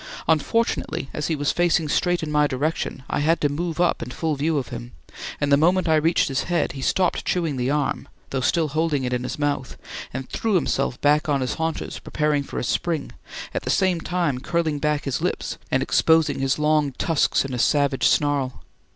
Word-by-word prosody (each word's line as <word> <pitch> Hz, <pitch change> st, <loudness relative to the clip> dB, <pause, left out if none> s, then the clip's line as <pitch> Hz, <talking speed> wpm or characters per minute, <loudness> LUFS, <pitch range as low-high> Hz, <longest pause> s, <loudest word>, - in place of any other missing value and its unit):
Unfortunately, 160 Hz, -, 0 dB
as 150 Hz, -, -2 dB
he 160 Hz, -, 0 dB
was 145 Hz, -1 st, 0 dB
facing 175 Hz, -2 st, +2 dB
straight 175 Hz, +3 st, +1 dB
in 150 Hz, -, -3 dB
my 150 Hz, 0 st, +3 dB
direction, 145 Hz, 0 st, -2 dB
I -, -, -1 dB
had 160 Hz, +3 st, +2 dB
to 145 Hz, -, +2 dB
move 165 Hz, +3 st, -3 dB
up 175 Hz, -1 st, +2 dB
in -, -, -5 dB
full 155 Hz, +4 st, -2 dB
view 150 Hz, +2 st, 0 dB
of 135 Hz, -, -3 dB
him, 120 Hz, 0 st, -8 dB, 0.5 s
and 145 Hz, -, 0 dB
the 140 Hz, -, +7 dB
moment 180 Hz, +4 st, +3 dB
I 160 Hz, -, +4 dB
reached 160 Hz, +3 st, +2 dB
his 135 Hz, -2 st, -1 dB
head, 175 Hz, -1 st, 0 dB
he 135 Hz, -, -8 dB
stopped 180 Hz, +6 st, +1 dB
chewing 165 Hz, -5 st, 0 dB
the 125 Hz, 0 st, -1 dB
arm, 145 Hz, -1 st, -1 dB, 0.2 s
though 135 Hz, -, -1 dB
still 160 Hz, +4 st, +1 dB
holding 155 Hz, -2 st, 0 dB
it 125 Hz, 0 st, -1 dB
in 125 Hz, -, 0 dB
his 125 Hz, -, -4 dB
mouth, 145 Hz, -3 st, -2 dB, 0.3 s
and 130 Hz, +1 st, -5 dB
threw 220 Hz, -3 st, -1 dB
himself 145 Hz, -7 st, 0 dB
back 150 Hz, +2 st, +3 dB
on 140 Hz, -2 st, +1 dB
his 130 Hz, -, -1 dB
haunches, 160 Hz, 0 st, -3 dB
preparing 150 Hz, -1 st, 0 dB
for 140 Hz, -, -7 dB
a -, -, -1 dB
spring, 160 Hz, +4 st, -1 dB, 0.4 s
at -, -, -1 dB
the -, -, -5 dB
same 185 Hz, -3 st, +2 dB
time 170 Hz, -8 st, -1 dB
curling 160 Hz, 0 st, -1 dB
back 150 Hz, 0 st, 0 dB
his 135 Hz, -3 st, -2 dB
lips -, -, -2 dB
and -, -, +1 dB
exposing 160 Hz, -3 st, +3 dB
his 135 Hz, 0 st, +1 dB
long 150 Hz, -2 st, +2 dB
tusks 155 Hz, 0 st, +1 dB
in 135 Hz, -, -5 dB
a 125 Hz, -, -2 dB
savage 140 Hz, 0 st, +2 dB
snarl. 145 Hz, -3 st, +1 dB
150 Hz, 210 wpm, -23 LUFS, 140-165 Hz, 0.5 s, the